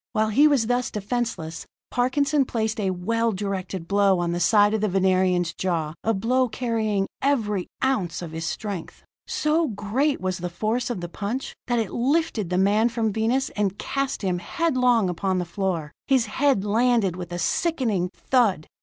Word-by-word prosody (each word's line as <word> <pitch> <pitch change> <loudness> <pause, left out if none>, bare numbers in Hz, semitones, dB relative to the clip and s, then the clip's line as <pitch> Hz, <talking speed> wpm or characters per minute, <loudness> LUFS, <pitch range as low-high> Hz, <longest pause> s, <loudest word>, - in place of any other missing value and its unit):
While 215 0 +2
he 285 +8 +5
was 280 -6 +3
thus 245 +1 0
defenseless, 210 -7 -3 0.2
Parkinson 275 +4 +2
placed 220 -3 -2
a 195 -2 0
well 230 +6 0
directed 190 -3 -4
blow 200 -1 +3
on 175 -1 -1
the 175 - -1
side 205 +5 +4
of 220 - 0
the 215 - +2
Venerian's 185 -2 +2
jaw, 165 -4 -2
a 225 - +2
blow 245 +5 +1
carrying 220 -4 -1 0.2
every 215 -9 0 0.2
ounce 190 -11 0
of 165 - -7
his 160 0 -4
strength. 200 -5 -5 0.2
So 310 +2 +1
great 235 +7 0
was 185 -1 -2
the 180 +1 -3
force 220 +8 -1
of 235 -7 -3
the 175 - -4
punch, 210 +9 -4
that 240 -1 +1
it 220 -4 -1
lifted 255 - 0
the 180 - 0
man 205 +5 +3
from 225 -3 -1
Venus 235 +5 +1
and 205 -2 -1
cast 275 -5 -2
him 180 -2 0
headlong 250 - +2
upon 185 +1 -1
the 180 - -1
floor. 170 -4 -2 0.2
His 260 -4 +3
head 265 -8 +1
landed 225 -3 +2
with 175 -1 -7
a 175 - -3
sickening 220 - 0
thud. 220 -11 +1
210 Hz, 175 wpm, -24 LUFS, 185-245 Hz, 0.2 s, he